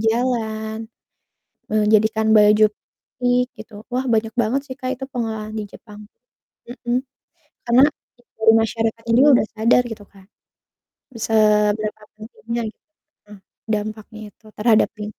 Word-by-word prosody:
jalan, 220 Hz, -1 st, -2 dB, 0.8 s
menjadikan 215 Hz, +1 st, +2 dB
baju 210 Hz, 0 st, +6 dB, 0.6 s
unik 245 Hz, 0 st, +2 dB
gitu, 220 Hz, 0 st, -13 dB
wah 255 Hz, +2 st, -2 dB
banyak 220 Hz, 0 st, 0 dB
banget 240 Hz, +3 st, 0 dB
sih 260 Hz, -, -7 dB
Kak, 260 Hz, -1 st, -5 dB
itu 265 Hz, -, -6 dB
pengolahan 220 Hz, -4 st, -5 dB
di 215 Hz, -, -3 dB
Jepang. 210 Hz, +1 st, -13 dB, 0.7 s
Mhm. 240 Hz, 0 st, -2 dB, 0.7 s
Karena 240 Hz, +2 st, +4 dB, 0.5 s
dari 220 Hz, 0 st, +5 dB
masyarakatnya 225 Hz, 0 st, -2 dB
juga 280 Hz, +4 st, +6 dB
udah -, -, -1 dB
sadar, 230 Hz, +3 st, +4 dB
gitu 215 Hz, -2 st, -8 dB
Kak, 190 Hz, -1 st, -19 dB, 1.0 s
seberapa 215 Hz, -1 st, +2 dB
pentingnya 230 Hz, +2 st, -6 dB
gitu -, -, -32 dB, 0.5 s
heeh, 210 Hz, -1 st, -13 dB, 0.3 s
dampaknya 215 Hz, 0 st, -4 dB
itu 215 Hz, -, -26 dB
terhadap 220 Hz, 0 st, +3 dB
ling 210 Hz, 0 st, -5 dB
220 Hz, 120 wpm, -20 LUFS, 215-235 Hz, 1.0 s, baju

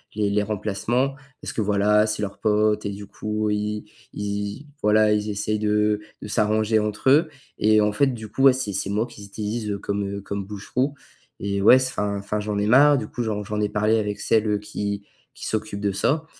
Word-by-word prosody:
les 105 Hz, -2 st, +1 dB
les 105 Hz, 0 st, +2 dB
remplacements 110 Hz, +6 st, -1 dB, 0.3 s
parce -, -, -5 dB
que, 110 Hz, -, -1 dB
voilà, 105 Hz, +1 st, +3 dB
c'est 105 Hz, 0 st, -2 dB
leur 100 Hz, -, -5 dB
pote 105 Hz, 0 st, +2 dB
et -, -, -1 dB
du 100 Hz, +1 st, -7 dB
coup, 105 Hz, +1 st, -2 dB
ils 105 Hz, 0 st, -2 dB, 0.3 s
ils, 105 Hz, +6 st, -4 dB, 0.2 s
voilà, 105 Hz, 0 st, +4 dB
ils 105 Hz, 0 st, -1 dB
essayent 105 Hz, +1 st, -1 dB
de 105 Hz, 0 st, +1 dB, 0.2 s
de -, -, -5 dB
s'arranger 110 Hz, +1 st, +2 dB
entre 105 Hz, +4 st, 0 dB
eux 155 Hz, +2 st, +5 dB, 0.3 s
et 110 Hz, 0 st, +4 dB
en 105 Hz, 0 st, +3 dB
fait, 135 Hz, +7 st, +2 dB
du 115 Hz, -4 st, -4 dB
coup, 135 Hz, -, -4 dB
ouais, 135 Hz, -2 st, +8 dB
c'est 115 Hz, -6 st, -3 dB
c'est 95 Hz, +1 st, -2 dB
moi 105 Hz, +3 st, 0 dB
qu'ils 105 Hz, -4 st, -12 dB
utilisent, 105 Hz, +2 st, -4 dB
heu, 100 Hz, -, -1 dB
comme, 100 Hz, 0 st, -2 dB
heu, -, -, -6 dB
comme 100 Hz, 0 st, -4 dB
bouche-trou 125 Hz, +8 st, -2 dB, 0.5 s
et 100 Hz, 0 st, -1 dB
ouais, 110 Hz, -, +8 dB
s 130 Hz, 0 st, +2 dB
enfin 100 Hz, -3 st, -2 dB
enfin, 100 Hz, +1 st, -3 dB
j'en 105 Hz, 0 st, -2 dB
ai 105 Hz, -, +1 dB
marre, 145 Hz, +5 st, +6 dB
du 110 Hz, -5 st, -3 dB
coup. 120 Hz, -, -5 dB
J'en 105 Hz, -2 st, -2 dB
j'en 105 Hz, +1 st, -3 dB
ai 105 Hz, -, +2 dB
parlé 105 Hz, +2 st, +2 dB
avec 105 Hz, -1 st, -3 dB
celle, 110 Hz, -1 st, +2 dB
heu, 105 Hz, -, +2 dB
qui 100 Hz, -1 st, -4 dB, 0.3 s
qui -, -, -9 dB
s'occupe 110 Hz, -2 st, -3 dB
de 100 Hz, -, +1 dB
ça 155 Hz, +10 st, 0 dB
105 Hz, 220 wpm, -24 LUFS, 105-110 Hz, 0.5 s, ouais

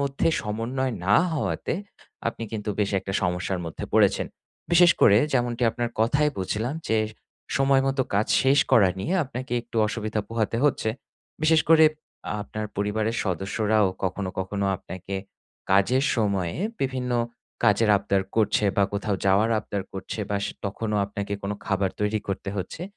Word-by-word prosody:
মধ্যে 140 Hz, +3 st, 0 dB
সমন্বয় 115 Hz, +5 st, -2 dB
না 105 Hz, -, +5 dB, 0.2 s
হওয়াতে, 155 Hz, -, -1 dB, 0.5 s
আপনি 115 Hz, -, -7 dB
কিন্তু 105 Hz, -1 st, -3 dB
বেশ 100 Hz, -1 st, +1 dB
একটা 95 Hz, -, -5 dB
সমস্যার 90 Hz, +1 st, -1 dB
মধ্যে 80 Hz, -, -6 dB
পড়েছেন। -, -, +3 dB, 0.5 s
বিশেষ 175 Hz, 0 st, +7 dB
করে 100 Hz, -2 st, +7 dB, 0.2 s
যেমনটি 120 Hz, -1 st, 0 dB
আপনার 120 Hz, 0 st, -3 dB
কথায় 145 Hz, +6 st, +3 dB
বুঝলাম 110 Hz, +8 st, -2 dB
যে, 110 Hz, 0 st, +3 dB, 0.6 s
সময় 135 Hz, -1 st, +4 dB
মতো 135 Hz, -1 st, +1 dB
কাজ 105 Hz, +2 st, +2 dB, 0.2 s
শেষ 135 Hz, +2 st, +4 dB
করা 105 Hz, -7 st, +7 dB
নিয়ে 170 Hz, -, -2 dB
আপনাকে 125 Hz, -1 st, -6 dB
একটু 115 Hz, -1 st, -10 dB
অসুবিধা 110 Hz, -1 st, -2 dB
পোহাতে 115 Hz, 0 st, -1 dB
হচ্ছে। 130 Hz, -5 st, +2 dB, 0.5 s
বিশেষ 160 Hz, 0 st, +5 dB
করে 160 Hz, -1 st, +7 dB, 0.6 s
আপনার 110 Hz, 0 st, -5 dB
পরিবারের 110 Hz, +3 st, 0 dB
সদস্যরাও 105 Hz, +3 st, +1 dB, 0.2 s
কখনো, 95 Hz, +1 st, -2 dB
কখনো 100 Hz, +1 st, -2 dB
আপনাকে 95 Hz, +1 st, -8 dB, 0.6 s
কাজের 110 Hz, +8 st, +3 dB
সময়ে 100 Hz, -6 st, 0 dB, 0.2 s
বিভিন্ন 130 Hz, -2 st, -1 dB, 0.5 s
কাজের 105 Hz, +2 st, +4 dB
আবদার 100 Hz, -1 st, 0 dB
করছে 110 Hz, -1 st, +2 dB
বা 100 Hz, -, +5 dB
কোথাও 100 Hz, 0 st, -1 dB
যাওয়ার 105 Hz, +4 st, +4 dB
আবদার 100 Hz, -2 st, -4 dB
করছে। 95 Hz, +3 st, -5 dB
বাস 100 Hz, 0 st, 0 dB, 0.2 s
তখনও 105 Hz, +2 st, -2 dB
আপনাকে 100 Hz, 0 st, -5 dB
কোনো 100 Hz, +1 st, -2 dB
খাবার 95 Hz, -1 st, +1 dB
তৈরি 105 Hz, +1 st, +1 dB
করতে 100 Hz, 0 st, -3 dB
হচ্ছে। 95 Hz, -, -5 dB
110 Hz, 145 wpm, -25 LUFS, 100-125 Hz, 0.6 s, বিশেষ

